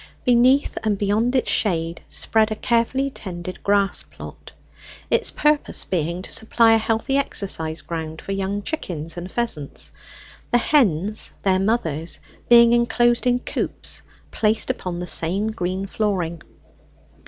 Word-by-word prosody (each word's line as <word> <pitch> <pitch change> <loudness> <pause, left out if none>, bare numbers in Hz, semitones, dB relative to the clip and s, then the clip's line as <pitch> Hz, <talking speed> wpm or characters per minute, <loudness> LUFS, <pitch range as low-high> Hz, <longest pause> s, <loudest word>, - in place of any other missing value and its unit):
Beneath 250 +3 +3
and 215 -2 0
beyond 215 +5 0
its 255 - +2
shade 165 -4 +1
spread 220 -1 +2
a - - -1
carefully 240 +5 0
tended 185 -5 -7
grass 200 -1 +2
plot, - - -12 0.6
its - - +4
purpose 300 0 +1
being 170 +1 -2
to - - -1
supply 225 +1 +4
a 225 - +4
healthy 225 +5 0
exercise 170 - -1
ground 160 -1 -5
for - - -7
young 195 +1 -2
chickens 165 - -3
and 180 +1 -7
pheasants; 200 - -2 0.6
the 240 - +3
hens, 215 - +2
their 190 -1 +2
mothers, 170 -7 -1 0.3
being 235 0 +7
enclosed 240 +1 +2
in 245 0 +2
coops - - -3 0.3
placed 215 0 +2
upon 180 -2 -5
the 175 - -4
same 185 +5 -1
green 185 -2 -3
flooring. 185 -6 -2
205 Hz, 135 wpm, -22 LUFS, 175-235 Hz, 0.6 s, being